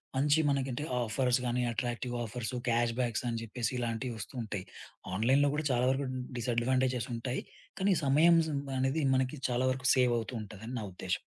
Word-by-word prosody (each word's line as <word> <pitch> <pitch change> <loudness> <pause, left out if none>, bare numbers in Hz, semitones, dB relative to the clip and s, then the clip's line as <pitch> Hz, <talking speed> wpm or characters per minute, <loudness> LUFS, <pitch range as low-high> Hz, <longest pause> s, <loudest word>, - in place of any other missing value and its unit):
మంచి 145 +3 +3
మనకంటే 135 0 -1 0.2
ఆఫర్స్ 125 +2 +1
గాని, 125 +1 0
అట్రాక్టివ్ 120 +1 -2
ఆఫర్స్, 120 +2 -4
క్యాష్ 120 0 +2
బ్యాక్స్ 120 -2 0
అని 115 -1 -1
జెప్పేసి 115 +1 -2
ఇలాంటివి 120 +1 -2
వస్తూ 105 - -7
ఉంటాయి. 105 -4 -4 0.5
ఆన్‌లైన్‌లో 135 +7 +4
గూడా 150 0 -2
చాలా 125 0 +2
వరకు 135 +1 -1 0.3
డిసడ్వాంటేజేస్ 125 +1 +1
ఉంటాయి. 125 +2 -3 0.4
కానీ 195 +1 +3
సమయం 160 +5 +6
సం 145 -3 -1
మనేది 135 +3 0
మనకి 130 +3 0
చాలా 125 +1 +1
వరకు 130 0 -2
సేవ్ 125 -2 +4
అవుతూ 115 +2 -5
ఉంటదని 110 +4 -8
నా - - -4
ఉద్దేశం. 90 0 -2
125 Hz, 165 wpm, -31 LUFS, 115-135 Hz, 0.5 s, సమయం